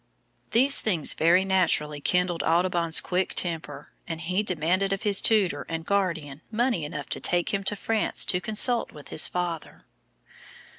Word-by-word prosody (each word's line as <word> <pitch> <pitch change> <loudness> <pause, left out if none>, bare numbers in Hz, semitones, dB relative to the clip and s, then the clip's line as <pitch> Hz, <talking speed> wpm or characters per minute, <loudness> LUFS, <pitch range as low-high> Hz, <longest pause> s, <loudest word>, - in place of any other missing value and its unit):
These 265 +5 +3
things 175 -9 0
very 175 +4 +3
naturally 160 -6 +1
kindled 180 +1 0
Audubon's 170 -1 +2
quick 185 +1 -2
temper, 155 -4 -3 0.2
and 165 -2 -5
he 180 +4 -1
demanded 185 0 -1
of 195 - -3
his 200 -2 +5
tutor 195 -10 +1
and 165 0 -5
guardian 165 -8 -2
money 235 -5 -1
enough 150 - -7
to - - -2
take 175 +2 0
him 200 0 -1
to 210 - +1
France 220 +2 0
to 180 -2 0
consult 230 +4 +2
with 150 - -13
his - - +3
father. 175 -3 -5
180 Hz, 155 wpm, -25 LUFS, 165-200 Hz, 0.2 s, his